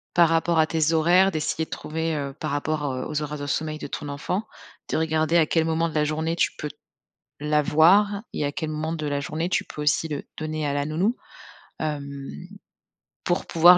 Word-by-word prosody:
Par 170 -1 +6
rapport 165 0 +2
à 155 - +5
tes 160 0 +1
horaires, 180 +4 +5
d'essayer 160 0 -1
de - - -27
trouver, 160 +1 -2
heu, 140 -2 -3
par - - -2
rapport, 145 0 -1
heu, 130 - -3
aux 150 0 -2
horaires 150 0 -5
de 145 - -4
sommeil 155 +1 -2
de - - -5
ton 145 -2 -5
enfant, 180 +8 -2 0.5
de - - +1
regarder 160 +1 +2
à 160 - +4
quel 160 -1 +2
moment 165 +1 +1
de 160 - -10
la 150 - +3
journée 160 +2 -1
tu - - +2
peux 150 - -4 0.7
l'avoir 160 +8 +4
et 145 - -1
à 145 - -2
quel 155 +1 -3
moment 155 +1 -2
de 155 -2 -3
la 145 -1 0
journée, 160 +4 -2
tu - - +1
peux 150 - -7
aussi 150 +2 +2
le 145 -2 -3 0.2
donner 155 -1 -2
à 140 - 0
la 145 0 0
nounou, 185 +10 +1 0.6
hem, 150 -2 -2 1.2
pour 175 - +1
pouvoir 175 +2 +7
155 Hz, 210 wpm, -25 LUFS, 150-165 Hz, 1.2 s, pouvoir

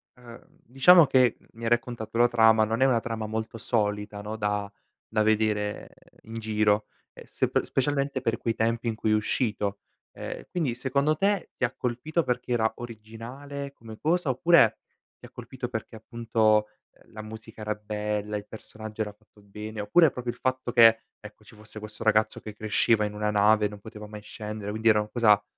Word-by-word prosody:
uhm, 120 -1 -14 0.2
diciamo 155 +7 +7
che, 130 -3 +3
mi 115 - -13
hai 115 - 0
raccontato 120 -2 -1
la 120 - +6
trama. 110 -2 +5
Non 115 +3 -2
è - - +6
una 125 -3 +3
trama 115 -2 -4
molto 110 +1 -4
solita, 105 -2 -1
no, 105 +1 -5
da 105 -1 -2 0.4
da 110 -1 +2
vedere 105 -1 0 0.4
in 115 +1 -7
giro 105 -1 +1 0.3
e - - -13
se - - -1
pe - - 0
specialmente 140 0 -1
per 115 -2 0
quei 115 - -1
tempi 115 +1 0
in 115 - -1
cui 110 0 -2
è - - +4
uscito, 105 -2 -1 0.3
ehm, - - -7
quindi, 155 -9 -1
secondo 140 +4 +1
te, 195 +2 0
ti - - -4
ha 120 - -3
colpito 140 +7 -1
perché 125 0 -2
era 110 -1 +2
originale 120 +5 -8
come 110 -3 -12
cosa 165 -1 +1
oppure 130 -4 +4 0.4
ti - - -13
ha - - -20
colpito - - -7
perché, - - -6
appunto, 110 -1 +1 0.2
ehm, - - -25
la 110 - -8
musica 110 0 -10
era 105 0 -1
bella, 105 0 -3
il 105 - -8
personaggio 110 0 -8
era 105 -1 -2
fatto 105 0 -25
bene, 105 +2 -8
oppure 155 +10 +5
proprio 125 -1 -4
il - - -16
fatto 130 -1 -1
che, 115 -1 +7 0.2
ecco, 105 0 -13
ci 110 - -16
fosse 105 0 -10
questo 105 +1 -8
ragazzo 110 0 +2
che 110 - -9
cresceva 110 +1 +2
in 105 - -4
una 105 0 -1
nave, 105 +1 +4
non 105 0 -10
poteva 105 0 -10
mai 105 0 -9
scendere, 105 0 -7
quindi 110 +2 +1
era 105 -1 +5
una 105 0 -3
cosa 105 -3 +4
110 Hz, 190 wpm, -27 LUFS, 105-120 Hz, 0.4 s, diciamo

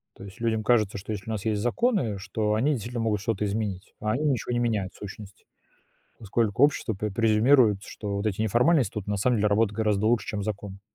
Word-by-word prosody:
То - - -12
есть 95 +2 -12
людям 110 -2 0
кажется, 105 -4 +2
что, 100 +2 -7
если 105 +2 -7
у - - -1
нас 105 0 -5
есть 105 -2 0
законы, 120 - +1
что 105 +2 -1
они 130 +8 +2
действительно 120 0 -4
могут 105 -3 0
что-то 105 -2 -1
изменить. 100 -2 -3
А 110 - 0
они 145 +7 -1
ничего 130 -4 0
не 120 - +1
меняют, 110 -6 -1
сущность. 100 0 -11 0.7
Поскольку 110 +3 +1
общество 145 -5 +1
п 105 +1 -3
презюмирует, 110 +1 +4
что 100 -2 -5
вот 100 +2 -2
эти 105 +1 -1
неформальность 125 - +3
тут 105 -2 -5
на 105 - -1
самом 120 +5 +2
деле 105 0 +2
работают 105 0 +1
гораздо 105 -1 +1
лучше, 120 0 +2
чем 105 -4 -3
закон. 100 -2 -5
110 Hz, 215 wpm, -26 LUFS, 100-115 Hz, 0.7 s, презюмирует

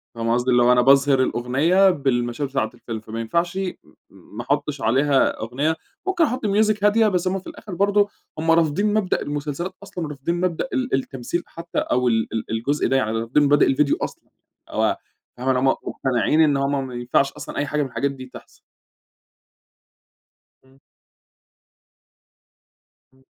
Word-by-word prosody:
فاهمة 115 0 0
قصدي؟ 125 +1 +1
اللي 120 0 +4
هو 120 - +5
أنا 125 0 +5
باظهر 135 +1 +5
الأغنية 140 +12 +3
بالمشاهد 135 -4 -1
بتاعة 135 -5 -1
الفيلم، 115 -2 -6
فما 110 +1 -7
ينفعش 170 +10 -1
م - - 0 0.5
م 105 - -17
ما - - -2
أحطش 145 +2 -2
عليها 135 +4 +2
أغنية. 135 +8 -1 0.3
ممكن 365 -3 +2
أحط 255 -5 -1
music 210 0 +2
هادية، 215 +2 +4
بس 185 -3 0
هم 190 +1 0
في 190 - -15
الآخر 205 - -9
برضو 205 +2 +2 0.3
هم 165 +1 +2
رافضين 165 +6 +2
مبدأ 210 -4 0
المسلسلات 150 +5 -4
أصلًا، 180 -4 -6
ورافضين 150 +3 -3
مبدأ 180 +5 -1
ال 255 -1 -1
التمثيل 135 +5 -3
حتى 170 +1 -5
أو 125 0 0
ال 115 -2 +1
ال 110 -1 -4
الجزء 125 +7 0
ده. 135 - +1
يعني 110 -5 0
رافضين 115 +6 +2
مبادئ 145 -1 +4
الڤيديو 145 +1 +2
أصلًا، - - -6 0.5
أو - - +1 0.4
فاهمة 130 +2 -2
اللي 130 - +1
هم 135 - +2
مقتنعين 135 +3 +1
إن 145 -3 +4
هم 140 0 -1
ما 125 - -9
ينفعش 125 +3 +1
أصلًا - - -8
أي 145 - 0
حاجة 150 +1 -1
مِن - - -3
الحاجات 140 +2 -1
دي 130 -2 -9
تحصل. - - -14 2.0
اهم. 130 0 -24 2.4
اهم. 130 0 -27
140 Hz, 165 wpm, -22 LUFS, 125-175 Hz, 2.4 s, هو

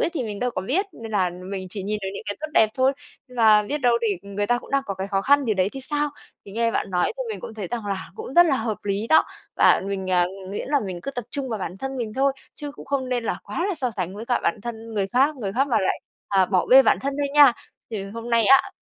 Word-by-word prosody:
ấy - - +1
thì 305 -7 -3
mình 210 -2 -5
đâu 250 +3 0
có 210 - -3
biết. 360 - 0
Nên 225 -1 -9
là 185 -3 +2
mình 185 +1 -6
chỉ 200 -2 -5
nhìn 210 +2 -2
được 190 - -2
những - - -6
cái 205 - -3
tốt 310 - -3
đẹp 220 - +6
thôi. 260 +1 +3 0.4
Nên 250 - -14
là 215 -2 +6
biết 290 +8 -3
đâu 240 -3 +3
đì 230 -2 0
người 200 +1 -3
ta 245 0 +2
cũng - - -13
đang 275 0 +2
có 195 - -3
cái 190 +1 -4
khó 195 -1 0
khăn 285 +2 +4
gì 220 -3 +1
đấy 190 0 +2
thì 270 - -6
sao? 295 +2 -1 0.4
Thì 195 - -10
nghe 230 +1 +1
bạn 195 - -2
nói 180 -1 +2
thì - - -2
mình 440 - -5
cũng 220 - -8
thấy 200 -5 -5
rằng 230 -4 -4
là 195 -2 -4
cũng 255 - -7
rất 345 0 +8
là 275 -4 +2
hợp 220 -3 -2
lý 200 +2 -1
đó. 315 - +5 0.3
Và - - +5
mình, 190 -1 -3
à, 180 -1 +4 0.2
nguyễn 205 - -5
là 285 -1 +2
mình 185 -4 -5
cứ 275 - -4
tập 245 -4 -5
trung 275 -2 -3
vào 220 -3 -3
bản 185 0 -5
thân 270 0 -4
mình 225 -3 -3
thôi, 275 +1 +2 0.2
chứ 290 -1 -6
cũng - - -11
không 270 -2 -1
nên 245 -2 -1
là - - -2
quá 350 - -3
là 385 - -1
so 255 -5 -1
sánh 185 -3 -4
với 225 - -7
cả 245 - +1
bản 210 - 0
thân 230 -1 -7
người 195 -2 0
khác 270 +7 +2
người 200 -6 -4
khác 270 +4 +1
mà 240 - +3
lại, 190 - 0 0.3
à, 190 -2 +3
bỏ 185 -2 +1
bê 265 +1 +8
bản - - +3
thân 275 +1 -2
thôi 285 -1 0
nha. 285 -4 +8 0.4
Thì 205 -3 -4
hôm 230 +4 -7
nay 230 -1 +4
á, 270 +5 +5
230 Hz, 300 wpm, -24 LUFS, 200-270 Hz, 0.4 s, rất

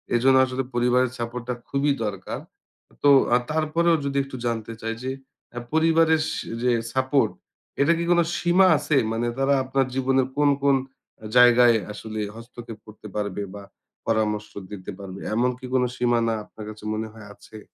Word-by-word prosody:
এজন্য 130 +2 +4
আসলে 130 +1 -3
পরিবারের 125 +1 +2
সাপোর্ট 120 +1 -4
টা 125 - +1 0.2
খুবই 140 +1 +1
দরকার। 100 -3 -5 0.6
তো 145 - +6 0.3
আ - - +6
তারপরেও 160 +2 +2
যদি 140 0 -2
একটু 135 -1 -9
জানতে 115 -1 -3
চাই 115 0 -2
যে 130 - -2 0.4
অ্যা 120 - -6
পরিবারের 160 0 +4
সে - - -4 0.2
রে 125 -1 +3 0.2
সাপোর্ট, 130 -3 +2 0.5
এটা 160 +4 +4
কি 170 - -1
কোন 175 - +4 0.2
সীমা 180 +2 +4
আছে? 145 0 0
মানে 115 +1 -1
তারা 135 +1 +2
আপনার 135 +1 0
জীবনের 130 0 +2
কোন, 145 -1 +4
কোন 140 -1 +5 0.5
আ - - -8
জায়গায় 120 -1 +7
আসলে 110 +1 -7 0.2
হস্তক্ষেপ 115 -1 -10
করতে 105 0 -12
পারবে 100 -1 -2
বা 100 - -9 0.4
পরামর্শ 105 -2 0 0.2
দিতে 95 -1 -7
পারবে? 95 -1 -8 0.2
এমন 125 +3 +2
কি 130 - -9
কোন 130 -1 +3
সীমানা 120 -2 +1
আপনার 105 0 -11
কাছে 110 0 -11
মনে 110 +1 -3
হয় 105 -2 -12
আছে? 110 -1 -13
125 Hz, 170 wpm, -24 LUFS, 110-140 Hz, 0.6 s, জায়গায়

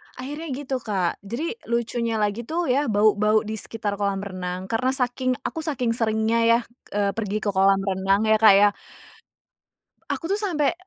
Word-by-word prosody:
Akhirnya 295 +6 -6
gitu 265 -1 -3
Kak, 195 -7 -2
jadi 310 - -4
lucunya 235 0 -1
lagi 215 +2 -1
tuh 330 -3 -1
ya 280 +3 +1
bau-bau 215 0 +3
di 220 0 -4
sekitar 205 -2 -4
kolam 200 -1 -1
renang 185 -2 -5
karena 255 +3 +1
saking 255 0 0
aku - - -4
saking 275 -7 -1
seringnya 225 0 +1
ya, 230 0 +5 0.4
eee, 200 -1 +1
pergi 210 0 -3
ke 205 - +1
kolam 195 0 +4
renang 195 +1 +1
ya 220 0 +4
Kak 215 -2 +8
ya. 205 +1 +6 1.4
Aku - - -3
tuh 405 - +1
sampai 340 -6 +1
220 Hz, 165 wpm, -24 LUFS, 205-255 Hz, 1.4 s, Kak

